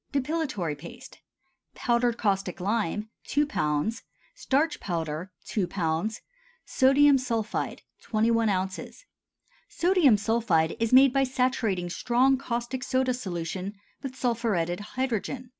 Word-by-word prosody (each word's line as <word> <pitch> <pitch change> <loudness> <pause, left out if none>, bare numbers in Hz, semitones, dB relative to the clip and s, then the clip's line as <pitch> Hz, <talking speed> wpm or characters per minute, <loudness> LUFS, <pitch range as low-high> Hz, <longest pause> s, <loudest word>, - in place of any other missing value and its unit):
DEPILATORY 275 - -1
PASTE. 235 - -11 0.6
Powdered 240 -1 +1
caustic 195 -4 -1
lime 210 +1 -1 0.2
2 295 +1 +2
lb. 155 - -1 0.3
Starch 295 +3 0
powder 165 0 -3
2 200 -5 -1
lb. 175 +4 -1 0.5
Sodium 275 +1 +5
sulphide 230 -4 -2 0.2
21 230 0 +1
oz. 190 - -3 0.6
Sodium 340 - +4
sulphide 205 -7 +1
is 230 -1 0
made 260 0 +7
by 275 -1 +3
saturating 250 -8 0
strong 250 +8 +2
caustic 250 0 -3
soda 260 -1 +1
solution 185 -3 -4 0.3
with 265 -1 -6
sulphuretted 220 -9 0 0.2
hydrogen. 255 0 -2
230 Hz, 110 wpm, -27 LUFS, 190-260 Hz, 0.6 s, made